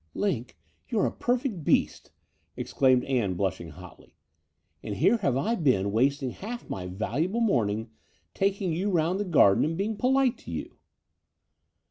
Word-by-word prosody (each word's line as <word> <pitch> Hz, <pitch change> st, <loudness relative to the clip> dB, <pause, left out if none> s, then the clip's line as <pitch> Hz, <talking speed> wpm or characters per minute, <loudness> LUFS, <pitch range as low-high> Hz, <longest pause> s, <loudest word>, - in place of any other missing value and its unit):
Linc, 125 Hz, -, -2 dB, 0.3 s
you're 215 Hz, -, +1 dB
a -, -, 0 dB
perfect 240 Hz, -, -1 dB
beast," -, -, +1 dB, 0.5 s
exclaimed 130 Hz, -2 st, +2 dB
Ann, 120 Hz, -9 st, 0 dB
blushing 90 Hz, -3 st, -2 dB
hotly: 90 Hz, +3 st, -14 dB, 0.7 s
"and 105 Hz, -, -5 dB
here 205 Hz, -, +3 dB
have 140 Hz, -, 0 dB
I 210 Hz, +12 st, 0 dB
been 125 Hz, -, +1 dB
wasting 130 Hz, +4 st, +1 dB
half 235 Hz, -, -7 dB
my 90 Hz, -1 st, -5 dB
valuable 135 Hz, -, -2 dB
morning 110 Hz, -, 0 dB, 0.4 s
taking 195 Hz, -3 st, 0 dB
you 185 Hz, +5 st, -1 dB
round 175 Hz, +1 st, +1 dB
the 205 Hz, -, -1 dB
garden 135 Hz, -, +5 dB
and 160 Hz, +2 st, -1 dB
being 210 Hz, +3 st, -1 dB
polite 260 Hz, +2 st, +2 dB
to -, -, -12 dB
you." -, -, -6 dB
155 Hz, 145 wpm, -27 LUFS, -, 0.7 s, garden